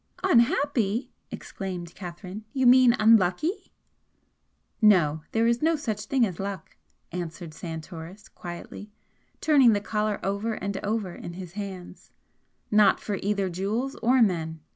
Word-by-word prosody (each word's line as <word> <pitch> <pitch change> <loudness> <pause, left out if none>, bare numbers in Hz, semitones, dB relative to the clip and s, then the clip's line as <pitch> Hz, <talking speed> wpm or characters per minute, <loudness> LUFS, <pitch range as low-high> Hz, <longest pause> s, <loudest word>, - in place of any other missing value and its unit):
"Unhappy!" 245 - +2 0.2
exclaimed 180 -3 -6
Catherine 180 +3 -8
"You 265 -1 +1
mean 250 -1 +7
unlucky?" 220 - +2 1.1
"No! 170 -8 +4
there 225 +1 +2
is 235 0 +2
no 325 +1 +3
such 215 -8 -4
thing 255 +1 +2
as 185 -5 -6
luck," 195 0 -6 0.4
answered 170 -1 -6
Santoris, 165 +4 -8
quietly, 175 +4 -9 0.5
turning 275 -7 +5
the 205 - +1
collar 210 0 -2
over 200 +3 -1
and 200 0 -4
over 205 -3 -2
in 170 - -8
his 180 -1 -8
hands 190 -2 -8 0.6
"Not 210 -2 +5
for 205 -2 -4
either 200 -1 0
jewels 205 +9 -2
or 250 +1 +4
men! 160 -5 -1
200 Hz, 130 wpm, -26 LUFS, 180-230 Hz, 1.1 s, mean